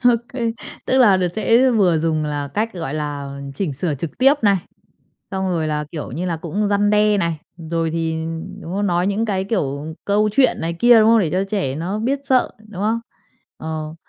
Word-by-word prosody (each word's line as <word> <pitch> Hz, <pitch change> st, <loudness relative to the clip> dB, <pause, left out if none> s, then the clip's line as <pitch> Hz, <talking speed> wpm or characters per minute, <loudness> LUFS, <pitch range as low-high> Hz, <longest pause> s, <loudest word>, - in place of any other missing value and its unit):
Ô 245 Hz, -, +8 dB, 0.2 s
kê. 235 Hz, -3 st, -1 dB, 0.3 s
Tức 260 Hz, -, +2 dB
là 210 Hz, -7 st, +6 dB
được 185 Hz, -1 st, +1 dB
sẽ 235 Hz, +4 st, +4 dB
vừa 190 Hz, -8 st, +3 dB
dùng 155 Hz, -1 st, 0 dB
là 145 Hz, -1 st, -3 dB
cách, 215 Hz, +9 st, -2 dB
gọi 165 Hz, -6 st, -4 dB
là, 145 Hz, -2 st, -4 dB
chỉnh 165 Hz, -1 st, -2 dB
sửa 150 Hz, +3 st, -2 dB
trực 145 Hz, +3 st, -6 dB
tiếp 270 Hz, +3 st, +6 dB
này, 200 Hz, -2 st, +4 dB, 0.8 s
xong 190 Hz, -1 st, -2 dB
rồi 165 Hz, -3 st, 0 dB
là, 150 Hz, 0 st, -1 dB
kiểu 155 Hz, -6 st, -6 dB
như 165 Hz, +8 st, -3 dB
là, 170 Hz, -2 st, -1 dB
cũng 190 Hz, +6 st, -2 dB
răn 205 Hz, 0 st, +2 dB
đe 210 Hz, 0 st, +3 dB
này, 170 Hz, -4 st, -1 dB, 0.3 s
rồi 165 Hz, -1 st, 0 dB
thì 160 Hz, -1 st, -2 dB, 0.4 s
đúng 165 Hz, -, -7 dB
không? 205 Hz, +1 st, 0 dB
Nói 175 Hz, +1 st, +1 dB
những 210 Hz, +3 st, 0 dB
cái 195 Hz, -3 st, -1 dB
kiểu 155 Hz, -7 st, -2 dB
câu 210 Hz, +1 st, +2 dB
chuyện 260 Hz, +4 st, +3 dB
này 165 Hz, +1 st, -1 dB
kia, 240 Hz, +6 st, +6 dB
đúng 220 Hz, 0 st, +5 dB
không? 230 Hz, 0 st, +6 dB
Để 175 Hz, -7 st, +1 dB
cho 185 Hz, +2 st, +1 dB
trẻ 195 Hz, -9 st, -2 dB
nó 180 Hz, +7 st, -3 dB
biết 265 Hz, +5 st, 0 dB
sợ, 255 Hz, -2 st, +2 dB, 0.2 s
đúng 195 Hz, -3 st, -7 dB
không? 220 Hz, +2 st, +1 dB, 0.6 s
Ờ, 155 Hz, 0 st, -5 dB
185 Hz, 215 wpm, -20 LUFS, 160-215 Hz, 0.8 s, Ô